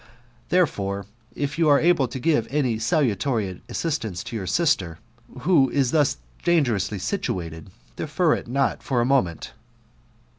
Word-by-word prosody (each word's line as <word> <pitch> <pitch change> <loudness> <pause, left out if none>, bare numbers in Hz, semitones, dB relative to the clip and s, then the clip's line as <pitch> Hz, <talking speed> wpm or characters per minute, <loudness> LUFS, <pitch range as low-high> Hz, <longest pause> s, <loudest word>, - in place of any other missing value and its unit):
Now, 120 0 -28
therefore, 100 - 0 0.3
if 145 +3 -3
you 160 -2 +4
are 145 - +6
able 165 -6 +3
to 120 - -6
give 130 -3 +1
any 130 -6 0
salutary 115 - 0
assistance 115 - -2
to - - -7
your 95 -4 -4
sister, 95 - +1 0.4
who 140 -4 +4
is 135 -3 +1
thus 150 - +2 0.3
dangerously 120 - +1
situated, 90 - -4 0.3
defer 155 +2 +1
it - - -4
not 135 +2 0
for 130 -3 -1
a 120 - +2
moment." 120 - 0
125 Hz, 145 wpm, -24 LUFS, 100-150 Hz, 0.4 s, are